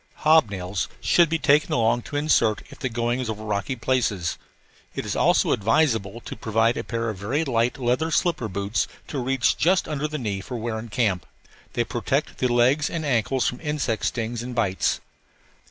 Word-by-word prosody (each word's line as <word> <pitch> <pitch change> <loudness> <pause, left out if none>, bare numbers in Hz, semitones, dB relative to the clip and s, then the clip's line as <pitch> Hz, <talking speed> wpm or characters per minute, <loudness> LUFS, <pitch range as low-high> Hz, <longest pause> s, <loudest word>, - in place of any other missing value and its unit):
Hob 155 -6 +6
nails 95 0 -3
should 170 -2 +4
be 165 - +1
taken 150 -1 +3
along 120 +1 +2
to 145 - -9
insert 145 -8 +2
if - - -13
the 130 - -2
going 120 +1 -1
is 125 -3 -3
over 110 0 -4
rocky 105 +5 -2
places. 115 -8 0 0.6
It - - -3
is - - -2
also - - +3
advisable 115 -1 +1
to - - -7
provide 115 +2 +1
a - - -3
pair 115 -1 -2
of 100 - -9
very 135 +11 -1
light 120 -1 +1
leather 125 +5 0
slipper 165 -8 +1
boots 100 +2 -1 0.2
to 140 - -3
reach 130 0 +2
to - - -20
just 180 +3 +3
under 150 0 -2
the 155 0 -4
knee 105 -7 -3
for 125 +5 -6
wear 110 -1 -3
in 115 +1 -8
camp. 105 -6 0 0.5
They - - +1
protect - - -2
the 130 - +2
legs 130 +5 +3
and 165 -2 -3
ankles 130 0 +1
from 125 - -3
insect 150 -8 -1
stings 115 0 -2
and 125 0 -6
bites. 100 -6 0
120 Hz, 195 wpm, -24 LUFS, 110-140 Hz, 0.6 s, Hob